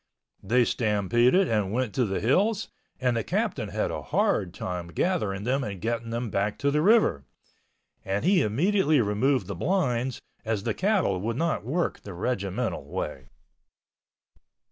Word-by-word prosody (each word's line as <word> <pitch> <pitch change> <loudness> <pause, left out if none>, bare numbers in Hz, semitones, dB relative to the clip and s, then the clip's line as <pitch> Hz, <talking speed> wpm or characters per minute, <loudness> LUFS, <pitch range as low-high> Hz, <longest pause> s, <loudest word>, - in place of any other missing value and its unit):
They 120 +5 +3
stampeded 120 - +2
and 105 -4 0
went 120 -2 -1
to 125 - +1
the 95 -2 -2
hills 200 - +1 0.3
and 125 -2 +1
the 115 - 0
captain - - -1
had - - -1
a - - -4
hard 90 - 0
time 90 -1 -5
gathering 100 - -1
them 130 +4 0
and 100 -4 -5
getting 115 +3 -2
them 115 -1 -3
back 100 +1 -1
to 140 - +1
the 150 +1 +2
river, 195 - +4 0.8
and 100 +7 -2
he 185 -1 +4
immediately 155 - +2
removed 110 +2 +1
the 100 - -5
blinds, 130 - 0 0.2
as 110 -3 -2
the 115 -1 0
cattle 185 - +1
would 115 +3 -2
not 165 -5 0
work 160 +9 -1
the 100 -3 -9
regimental 100 -1 -2
way. 65 0 -5
115 Hz, 155 wpm, -26 LUFS, 100-145 Hz, 0.8 s, river